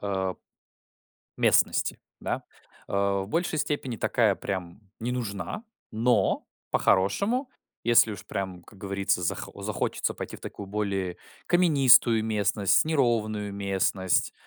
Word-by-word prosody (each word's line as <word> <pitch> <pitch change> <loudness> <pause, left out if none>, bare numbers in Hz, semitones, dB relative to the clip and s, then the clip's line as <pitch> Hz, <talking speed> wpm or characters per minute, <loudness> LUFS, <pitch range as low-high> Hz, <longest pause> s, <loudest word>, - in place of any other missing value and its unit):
а 95 -2 -2 1.0
местности, - - +3 0.2
да. - - -2 0.5
А, 100 0 +1
в 95 - -8
большей 165 0 -1
степени 135 -5 -2
такая 105 -1 +2
прям 95 0 -5 0.2
не 120 +2 -2
нужна, 120 - -4 0.3
но 120 +2 +1 0.2
по-хорошему, 200 - +2 0.4
если 115 -2 +5
уж - - -9
прям, 95 -3 -4
как 100 - -17
говорится, 100 -2 -1
зах 85 - -2
захочется - - -2
пойти - - -6
в - - -18
такую 100 - -8
более 95 -3 -2 0.3
каменистую 135 -10 +5
местность, 105 -1 +2
неровную 115 -9 0
местность, 95 -1 0
105 Hz, 115 wpm, -27 LUFS, 95-125 Hz, 1.0 s, если